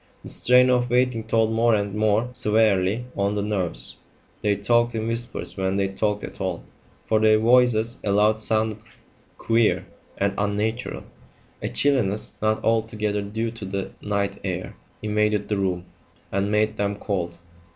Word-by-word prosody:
The - - -8
strain 125 +1 +4
of 125 -1 +2
waiting 125 -2 +1
told 110 0 +2
more 115 0 +3
and 100 -1 -2
more 110 +3 +1
severely 110 -2 +2
on 100 +1 0
the 100 - -1
nerves; 90 - -2 0.4
they 105 -1 +2
talked 120 +4 +2
in 110 0 -2
whispers 115 +1 -3
when 95 0 -1
they 100 -1 +1
talked 105 +1 -1
at - - -8
all, 95 -3 -2 0.4
for 110 - +2
their 110 0 +5
voices 120 0 +3
aloud 105 +2 +3
sounded 110 0 0 0.6
queer 115 -1 +2 0.3
and 100 0 +1
unnatural. 105 +4 -2 0.6
A - - -2
chilliness, 120 -8 +1
not 110 0 +1
altogether 110 -2 0
due 110 +3 -3
to 115 -2 -9
the 95 0 -4
night 100 -1 -2
air, 90 -1 -4 0.3
invaded 105 -1 0
the 105 - 0
room, 90 -2 -1 0.5
and 100 +1 0
made 105 +1 +1
them 100 0 0
cold. 90 -5 -3
105 Hz, 150 wpm, -24 LUFS, 100-115 Hz, 0.6 s, their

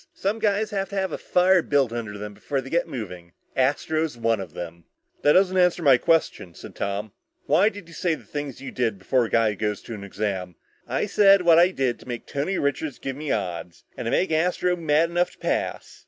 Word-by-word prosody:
Some 205 +3 -1
guys 210 0 +1
have 195 -2 -2
to 200 - -7
have 190 -1 -1
a - - -3
fire 180 0 +3
built 140 -6 +1
under 110 -3 -5
them 105 0 -7
before 140 +6 -3
they 135 0 -8
get 170 - +1
moving. 90 -7 -7 0.2
Astro's 145 +2 0
one 115 -2 +1
of 95 - -9
them." 85 -1 -7 0.4
"That 145 - +5
doesn't 185 0 +4
answer 180 -1 +3
my 135 -4 +7
question," 125 - 0
said - - -11
Tom. 100 +1 -3 0.3
"Why 175 +9 +4
did 200 -4 -11
you 170 - -14
say 165 +1 0
the - - -14
things 145 -3 -6
you 135 - -6
did 115 -5 -1
before 120 +6 +1
a - - -6
guy 115 -2 +3
goes 105 +1 -2
to - - -11
take 110 - -4
an - - -9
exam?" 95 -3 -3 0.3
"I - - 0
said 200 -2 +5
what 170 -1 +6
I 175 +1 +6
did 130 -9 -1
to - - -16
make 120 -2 -5
Tony 150 +7 -2
Richards 140 0 -1
give 135 -1 -5
me 150 +1 -6
odds. 90 -4 -4
And - - -6
to - - +1
make 185 - +1
Astro 180 +2 +1
mad 165 0 +2
enough 175 +1 +1
to - - -21
pass. - - -3
140 Hz, 230 wpm, -24 LUFS, 110-180 Hz, 0.4 s, my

